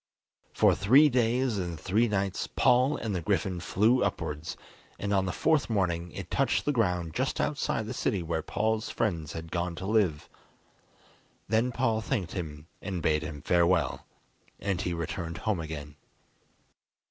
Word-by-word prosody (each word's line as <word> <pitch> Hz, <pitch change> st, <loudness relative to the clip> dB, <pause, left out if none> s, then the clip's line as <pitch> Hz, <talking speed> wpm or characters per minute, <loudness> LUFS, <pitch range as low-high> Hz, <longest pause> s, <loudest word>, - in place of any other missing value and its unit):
For -, -, +4 dB
three 135 Hz, +10 st, +6 dB
days 125 Hz, -2 st, +1 dB
and 85 Hz, -3 st, -4 dB
three 105 Hz, +8 st, +2 dB
nights 100 Hz, -3 st, -1 dB
Paul 130 Hz, +4 st, +3 dB
and 110 Hz, -3 st, -3 dB
the 90 Hz, -, -1 dB
griffin 95 Hz, 0 st, 0 dB
flew 110 Hz, +9 st, +2 dB
upwards, 75 Hz, +2 st, -3 dB, 0.4 s
and 100 Hz, 0 st, -2 dB
on 95 Hz, -1 st, +2 dB
the -, -, 0 dB
fourth 155 Hz, -, +2 dB
morning 90 Hz, -5 st, 0 dB
it -, -, -7 dB
touched -, -, +1 dB
the 145 Hz, -, +2 dB
ground 90 Hz, -, 0 dB
just 130 Hz, +6 st, -1 dB
outside 140 Hz, -6 st, -1 dB
the 110 Hz, -, -4 dB
city 100 Hz, -6 st, -1 dB
where 80 Hz, -1 st, -1 dB
Paul's 110 Hz, +4 st, -1 dB
friends 85 Hz, -8 st, -2 dB
had 80 Hz, 0 st, -7 dB
gone 85 Hz, 0 st, -2 dB
to 95 Hz, -, -6 dB
live. 100 Hz, -8 st, +1 dB, 1.2 s
Then 115 Hz, +3 st, +2 dB
Paul 115 Hz, -3 st, +1 dB
thanked 105 Hz, -7 st, -2 dB
him 75 Hz, -5 st, -6 dB, 0.2 s
and 95 Hz, -4 st, -4 dB
bade 75 Hz, -1 st, +2 dB
him 75 Hz, -2 st, -7 dB
farewell, 85 Hz, -4 st, +2 dB, 0.5 s
and 95 Hz, -2 st, -1 dB
he 90 Hz, -, -2 dB
returned 85 Hz, 0 st, -4 dB
home 110 Hz, -5 st, -1 dB
again. 75 Hz, -2 st, -6 dB
95 Hz, 160 wpm, -29 LUFS, 85-110 Hz, 1.2 s, three